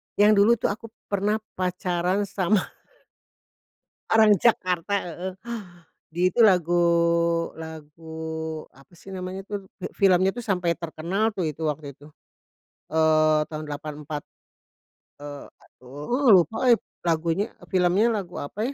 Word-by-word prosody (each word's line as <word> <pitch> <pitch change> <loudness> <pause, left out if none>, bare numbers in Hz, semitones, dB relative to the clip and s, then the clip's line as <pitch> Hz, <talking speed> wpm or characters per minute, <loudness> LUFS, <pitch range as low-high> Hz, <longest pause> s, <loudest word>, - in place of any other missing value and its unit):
Yang 210 +1 +5
dulu 210 +3 +6
tuh 210 - -1
aku 230 +3 -7 0.2
pernah 205 +2 +1 0.2
pacaran 180 +1 0
sama 200 0 +1 1.5
orang 220 -2 +6
Jakarta 185 -4 +2
heeh, 180 +2 -5 0.8
di 175 +3 +2
itu 235 - +5
lagu 175 -4 +4 0.7
lagu, 160 0 -7
apa 135 0 -20
sih 195 - -10
namanya 185 +1 -6
tuh, 200 -2 -6
fil - - -5
filmnya 190 -1 +4
tuh 245 - -5
sampai 180 -5 0
terkenal 175 +6 -2
tuh 190 -6 -3
itu, 155 +1 -5
waktu 150 -2 -3
itu. 145 +3 -16 0.8
Eee, 155 -1 +3
tahun 155 -1 -6
84. 150 0 -6 1.0
Eee, 145 -1 -8 0.2
aduh 150 - 0
lupa 225 +8 -3
euy 240 - +9 0.3
lagunya 165 +5 0 0.2
filmnya 185 +3 +3
lagu 180 -3 -6
apa 215 - -3
175 Hz, 120 wpm, -25 LUFS, 155-200 Hz, 1.5 s, euy